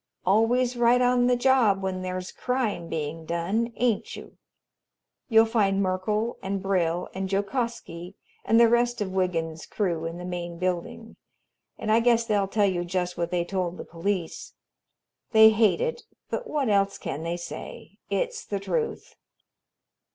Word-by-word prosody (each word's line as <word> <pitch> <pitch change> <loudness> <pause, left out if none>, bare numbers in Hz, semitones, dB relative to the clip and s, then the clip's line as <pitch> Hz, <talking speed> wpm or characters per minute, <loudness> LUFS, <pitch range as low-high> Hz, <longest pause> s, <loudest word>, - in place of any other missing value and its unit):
Always 235 +6 +3
right 240 +1 +4
on 245 0 +3
the 250 - +4
job 240 -6 +3
when 185 -1 -2
there's 185 0 -4
crime 240 -9 -2
being 160 +1 -4
done, 185 +9 -1
ain't 240 -4 0
you? - - -11 0.9
You'll 225 -1 +6
find 205 -4 +1
Merkel 200 +4 -1
and 195 0 -2
Brill 180 -3 0
and 190 0 -3
Jokosky 200 -4 -3 0.3
and 225 - +4
the 235 - +7
rest 240 +1 +2
of 200 -3 -2
Wiggins's 165 -4 -2
crew 170 -6 -1
in 165 +1 -6
the 180 - -7
main 175 -1 -5
building, 185 +5 -4 0.6
and 215 - -2
I 225 - +5
guess 235 -1 +3
they'll 205 -3 +1
tell 205 +1 +2
you 180 -3 0
just 180 0 -2
what 170 0 -2
they 175 -1 0
told 180 -1 -2
the - - -7
police. 175 0 -3 0.8
They 220 0 +9
hate 220 - +3
it, 480 -1 -2 0.3
but - - -3
what 290 -4 0
else 200 -1 +2
can 140 - -5
they 170 +1 -3
say? 175 - -9
It's 485 -1 -2
the 200 - -3
truth." 455 - -3
195 Hz, 160 wpm, -26 LUFS, 180-235 Hz, 0.9 s, They